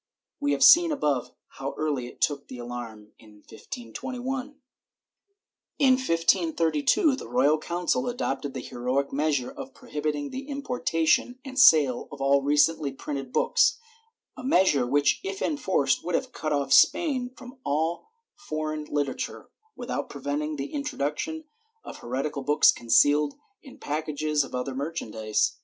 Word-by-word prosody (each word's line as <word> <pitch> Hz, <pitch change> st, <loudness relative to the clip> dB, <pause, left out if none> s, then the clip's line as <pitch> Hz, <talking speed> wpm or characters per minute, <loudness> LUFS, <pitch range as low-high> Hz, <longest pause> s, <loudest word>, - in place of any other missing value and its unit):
We 145 Hz, 0 st, +1 dB
have 140 Hz, -, +1 dB
seen 340 Hz, 0 st, +8 dB
above 145 Hz, -, 0 dB, 0.3 s
how 135 Hz, +1 st, -4 dB
early 145 Hz, -5 st, -1 dB
it -, -, -14 dB
took 145 Hz, -2 st, 0 dB
the 125 Hz, -, -9 dB
alarm 120 Hz, -3 st, -8 dB
in 105 Hz, -2 st, -18 dB
1521. 255 Hz, -, -6 dB, 1.2 s
In 270 Hz, -2 st, +5 dB
1532 165 Hz, -, +2 dB
the -, -, -9 dB
Royal 155 Hz, -11 st, +3 dB
Council 180 Hz, +10 st, -1 dB
adopted 145 Hz, -, -3 dB
the -, -, -4 dB
heroic 130 Hz, +3 st, -2 dB
measure 140 Hz, -3 st, 0 dB
of 270 Hz, 0 st, -9 dB
prohibiting 150 Hz, -, -4 dB
the 270 Hz, +1 st, -6 dB
importation 250 Hz, -, 0 dB
and 265 Hz, 0 st, -4 dB
sale 150 Hz, -, +5 dB
of 145 Hz, -, -9 dB
all 140 Hz, +1 st, +3 dB
recently 145 Hz, +1 st, +2 dB
printed 135 Hz, -1 st, -6 dB
books^ -, -, +3 dB, 0.3 s
— 455 Hz, +1 st, -47 dB
a 255 Hz, -, -9 dB
measure 180 Hz, -, +3 dB
which, 145 Hz, +2 st, +2 dB
if 195 Hz, 0 st, -4 dB
enforced, 190 Hz, -, 0 dB
would 175 Hz, -1 st, -1 dB
have 260 Hz, -1 st, -2 dB
cut 155 Hz, -9 st, -4 dB
off 140 Hz, -2 st, +1 dB
Spain 265 Hz, -7 st, +4 dB
from 255 Hz, 0 st, -12 dB
all 160 Hz, -, -1 dB, 0.2 s
foreign 155 Hz, -, -4 dB
literature, 145 Hz, -2 st, -3 dB, 0.2 s
without 245 Hz, -, -4 dB
preventing 145 Hz, +2 st, -3 dB
the 140 Hz, 0 st, -6 dB
intro 290 Hz, 0 st, -4 dB
duction 155 Hz, -, -3 dB, 0.4 s
of -, -, -9 dB
heretical 135 Hz, +4 st, -3 dB
books 145 Hz, +2 st, +5 dB
concealed 145 Hz, +6 st, +3 dB, 0.3 s
in 270 Hz, -, -14 dB
packages 150 Hz, 0 st, -1 dB
of 135 Hz, -, -8 dB
other 125 Hz, +2 st, -3 dB
merchan 140 Hz, -3 st, -4 dB
dise. 110 Hz, -1 st, 0 dB
150 Hz, 145 wpm, -26 LUFS, -, 1.2 s, seen